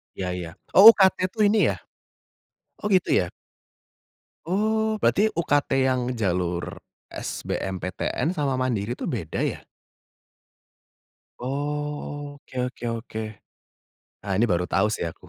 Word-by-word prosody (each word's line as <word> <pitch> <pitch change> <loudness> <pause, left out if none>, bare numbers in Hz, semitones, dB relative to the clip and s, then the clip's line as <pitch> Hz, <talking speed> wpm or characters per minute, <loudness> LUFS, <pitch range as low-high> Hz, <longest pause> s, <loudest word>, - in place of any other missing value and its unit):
Ya 90 -1 -3
ya, 90 -2 -6 0.2
oh, 205 +4 +11
UKT 190 -1 +4 0.2
tuh 215 -2 +1
ini 210 +1 +3
ya? - - -9 1.0
Oh, - - -3
gitu 185 -2 +3
ya? - - +2 1.2
Oh 215 +3 0
berarti 215 +2 +3
UKT 145 -4 +1 0.2
yang 130 -1 +1
jalur 90 -5 -2 0.3
SBMPTN 95 - -3
sama 135 -4 0
mandiri 120 -3 -1
tuh - - -5
beda 95 - -3
ya? - - -2 1.8
Oke 145 -1 -4
oke 125 -1 -8
oke. 115 -1 -5 1.0
Ah, 100 - -2
ini 120 - +3
baru 90 0 +1
tau 95 +3 +1
sih 105 - -2
aku, 85 - -8
130 Hz, 120 wpm, -25 LUFS, -, 1.8 s, oh